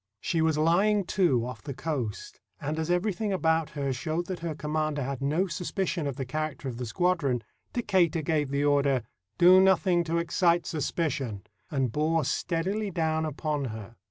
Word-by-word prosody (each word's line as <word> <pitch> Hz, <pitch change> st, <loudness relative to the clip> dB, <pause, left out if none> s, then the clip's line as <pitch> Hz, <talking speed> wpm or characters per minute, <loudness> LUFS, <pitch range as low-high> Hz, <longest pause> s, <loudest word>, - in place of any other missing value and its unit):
She 165 Hz, -, 0 dB
was 160 Hz, -1 st, +2 dB
lying 195 Hz, +7 st, +3 dB
to 160 Hz, -, +3 dB
off 125 Hz, -, -7 dB
the 140 Hz, -, -6 dB
coast, 130 Hz, -10 st, -4 dB, 0.2 s
and 150 Hz, +2 st, -3 dB
as 160 Hz, +1 st, -2 dB
every 180 Hz, +4 st, +1 dB
thing 210 Hz, +3 st, -2 dB
about 160 Hz, -4 st, +1 dB
her 140 Hz, -2 st, 0 dB
showed 155 Hz, +7 st, -2 dB
that 185 Hz, -1 st, -5 dB
her 165 Hz, -2 st, -4 dB
commander 150 Hz, 0 st, -1 dB
had 135 Hz, 0 st, -4 dB
no 155 Hz, +7 st, +1 dB
suspicion 180 Hz, -2 st, -2 dB
of 140 Hz, -, -3 dB
the 135 Hz, -, -4 dB
character 155 Hz, 0 st, -3 dB
of 120 Hz, -3 st, -4 dB
the 125 Hz, -1 st, -4 dB
squadron, 145 Hz, -5 st, +1 dB, 0.3 s
Decatur 185 Hz, -8 st, +2 dB
gave 150 Hz, -2 st, 0 dB
the 140 Hz, +1 st, 0 dB
order, 140 Hz, -3 st, +3 dB, 0.3 s
"Do 180 Hz, +2 st, +8 dB
nothing 185 Hz, -2 st, +4 dB
to 165 Hz, +1 st, 0 dB
excite 170 Hz, 0 st, +2 dB
suspicion," 140 Hz, -, -2 dB, 0.3 s
and 135 Hz, -5 st, 0 dB
bore 155 Hz, +3 st, +1 dB
steadily 190 Hz, +9 st, -1 dB
down 160 Hz, -2 st, 0 dB
upon 150 Hz, -1 st, -2 dB
her. 110 Hz, -1 st, -7 dB
155 Hz, 175 wpm, -28 LUFS, 140-175 Hz, 0.3 s, Do